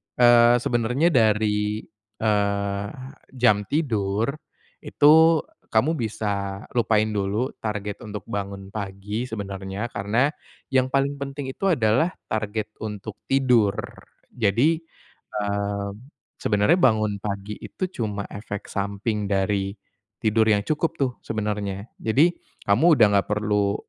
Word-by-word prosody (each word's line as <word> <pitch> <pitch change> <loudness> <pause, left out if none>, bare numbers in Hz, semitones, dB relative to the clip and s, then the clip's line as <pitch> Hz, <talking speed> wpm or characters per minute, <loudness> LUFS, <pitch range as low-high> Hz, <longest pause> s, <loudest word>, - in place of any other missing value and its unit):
eee, 120 0 +6
sebenernya 125 +7 +2
dari, 105 -3 +2 0.4
eee, 100 -1 0 0.5
jam 105 -5 +3
tidur, 110 -6 0 0.5
itu 160 +2 +5 0.3
kamu 115 +8 +2
bisa 100 -3 -3
lupain 110 -2 +2
dulu, 105 +5 -1
target 105 -1 -4
untuk 105 -2 -7
bangun 100 -1 -5
pagi 105 +3 -4
sebenarnya, 100 0 -5
karena 110 +8 +1 0.4
yang 130 -1 +3
paling 140 +1 0
penting 140 -1 -5
itu 195 - -2
adalah 155 - +2 0.2
target 110 0 -2
untuk 105 -1 -6
tidur. 125 -7 +3 0.6
Jadi, 120 +8 +2 0.6
eee, 100 -1 -2 0.5
sebenernya 105 +10 +3
bangun 110 - +3
pagi 100 0 -4
itu 185 - -4
cuma 105 -2 -2
efek 100 -1 -7
samping 100 +2 -2
dari 100 0 0 0.5
tidur 110 -1 +3
yang 105 -2 +4
cukup 155 +6 -1
tuh, 135 -2 +1
sebenernya. 105 -1 -3
Jadi, 140 +10 +3 0.4
kamu 150 +12 +5
udah 110 -3 +7
enggak 100 -1 +2
perlu 105 -1 +1
105 Hz, 115 wpm, -24 LUFS, 100-125 Hz, 0.6 s, udah